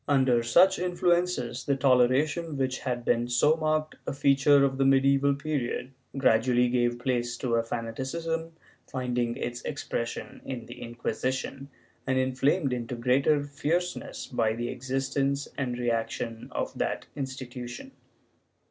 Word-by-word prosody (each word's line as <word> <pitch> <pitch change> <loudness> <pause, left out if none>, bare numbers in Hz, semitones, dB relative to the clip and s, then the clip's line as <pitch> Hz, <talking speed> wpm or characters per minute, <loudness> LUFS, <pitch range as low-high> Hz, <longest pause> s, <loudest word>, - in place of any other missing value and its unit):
Under 130 -4 +3
such 175 +12 +5
influences, 175 -8 0
the 140 - +2
toleration 140 +5 +2
which 130 -1 -1
had 120 -2 -3
been 120 0 +2
so 125 +6 +4
marked 155 -1 -1
a - - -1
feature 140 +1 +4
of 135 0 -2
the - - +4
medieval 135 +1 +4
period 140 -3 -3 0.3
gradually 125 -1 +3
gave 120 -1 +1
place 120 -1 -1
to 120 -2 -2
a 115 - +4
fanati 115 0 -5
cism 165 +4 -3 0.4
finding 125 -2 -1
its 120 0 -4
expression 120 -5 -4
in 125 -3 -6
the 120 - -10
Inquisition 130 +3 -3 0.4
and 130 0 +1
inflamed 130 +3 +1
into 120 0 -3
greater 135 +5 +2
fierceness 165 +5 -2
by 110 -3 0
the 120 +1 -3
existence 135 +2 -1
and 125 -3 -2
reaction 115 -1 -2
of - - -3
that - - -1
institution. 130 - -6
130 Hz, 135 wpm, -28 LUFS, 120-140 Hz, 0.4 s, such